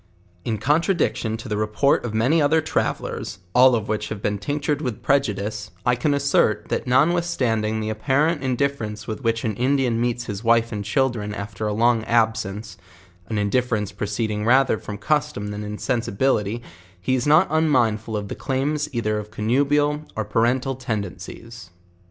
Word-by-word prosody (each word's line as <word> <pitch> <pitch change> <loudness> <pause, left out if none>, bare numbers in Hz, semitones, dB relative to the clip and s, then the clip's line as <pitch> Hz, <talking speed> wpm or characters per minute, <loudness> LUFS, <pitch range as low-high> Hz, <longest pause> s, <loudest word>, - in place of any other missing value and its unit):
In 110 -2 -1
contradiction 150 - +1
to 115 - -9
the 105 -2 -2
report 110 +6 +2
of 120 - -3
many 125 +9 +2
other 150 +2 +4
travellers, 105 - -2 0.2
all 125 0 +6
of 110 -3 -2
which 110 0 -2
have 110 - -5
been 105 0 -1
tinctured 145 +6 -1
with 125 -8 -4
prejudice, 105 -7 0 0.2
I 125 - +4
can 145 +4 +1
assert, 110 -7 +1
that - - -2
notwithstanding 125 -7 +1
the 110 0 -2
apparent 140 +8 +1
indifference 125 -5 -2
with 110 +4 -5
which 115 -1 0
an 110 - 0
Indian 125 -2 +1
meets 120 0 -1
his 100 0 -5
wife 115 0 +3
and 105 -2 -3
children 110 -2 0
after 105 +1 -4
a 105 - -1
long 115 +1 +3
abscence, 110 -3 0 0.5
an 110 - -2
indifference 105 0 0
proceeding 105 +1 -2
rather 130 0 +4
from 105 - -7
custom 120 -6 -1
than 105 0 -5
insensi 105 +3 -2
106 100 - -8
JOURNAL 135 +4 +3
OF 105 - -5
bility, 115 +4 -4
lie 90 +5 -6
is 130 +1 0
not 155 +5 +5
unmindfil 120 -9 +1
of 100 -1 -4
tho - - -5
cl'iirrio 140 +3 -1 0.2
eith: 115 +7 +1
of 155 - -15
or 110 - -2
parental 120 +5 +1
tenderness. 110 -3 -6
115 Hz, 170 wpm, -23 LUFS, 105-135 Hz, 0.5 s, all